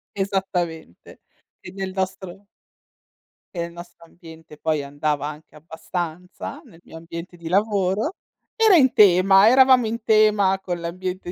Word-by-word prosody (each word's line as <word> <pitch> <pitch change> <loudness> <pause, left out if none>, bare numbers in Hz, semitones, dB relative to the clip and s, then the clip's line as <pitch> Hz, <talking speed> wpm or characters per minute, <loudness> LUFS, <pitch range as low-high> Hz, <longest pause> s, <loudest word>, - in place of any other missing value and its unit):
Esattamente. 180 - -4 0.4
E 180 - -10
nel 190 -1 -5
nostro 190 0 -5 1.1
E 170 - -5
nel 170 0 -5
nostro 170 0 -13
ambiente 160 -3 -15
poi 155 -2 -1
andava 145 +1 -3
anche 150 +1 -11
abbastanza, 170 +3 -7
nel 165 - -18
mio 160 - -12
ambiente 170 +2 -9
di 170 - -10
lavoro. 200 - 0 0.4
Era 440 -4 +5
in 265 -6 +4
tema, 195 0 +5
eravamo 255 0 +5
in 225 +1 -4
tema 210 -3 +3
con 175 -2 -5
l'ambiente 180 +1 -5
180 Hz, 135 wpm, -22 LUFS, 165-200 Hz, 1.1 s, Era